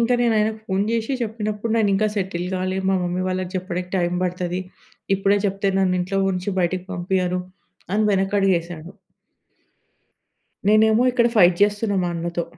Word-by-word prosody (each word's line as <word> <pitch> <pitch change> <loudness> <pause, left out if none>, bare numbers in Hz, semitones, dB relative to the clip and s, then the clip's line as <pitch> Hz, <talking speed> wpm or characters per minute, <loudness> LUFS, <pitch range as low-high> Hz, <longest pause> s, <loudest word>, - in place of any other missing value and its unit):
ఇంక 235 +1 +2
నేనాయనకి 220 -2 +1
ఫోన్ 195 0 0
జేషి 230 +3 -1
చెప్పినప్పుడు, 215 -1 -3
"నేనింకా 215 -1 +2
సెటిల్ 180 -3 -2
గాలే, 185 0 -2
మా 195 - +3
మమ్మీ 180 +1 -2
వాళ్ళకి 185 -1 -2
చెప్పడికి 180 -1 -4
టైం 175 -1 0
పడతది. 180 0 -2 0.6
ఇప్పుడే 195 +1 +2
చెప్తే 195 0 -1
నన్ను 185 -1 +2
ఇంట్లో 190 +2 -2
ఉంచి 185 +2 -3
బయటకి 180 +1 -1
పంపియ్యరు" 180 0 -1 0.5
అని 215 - +2
వె‌నకడుగేశాడు. 190 -4 0 1.8
నేనేమో 220 +2 +5
ఇక్కడ 235 -1 +3
ఫైట్ 175 -3 +5
జేస్తున్నా 205 0 +1
మా - - 0
అన్నతో. 170 0 -3
190 Hz, 140 wpm, -22 LUFS, 180-210 Hz, 1.8 s, నేనేమో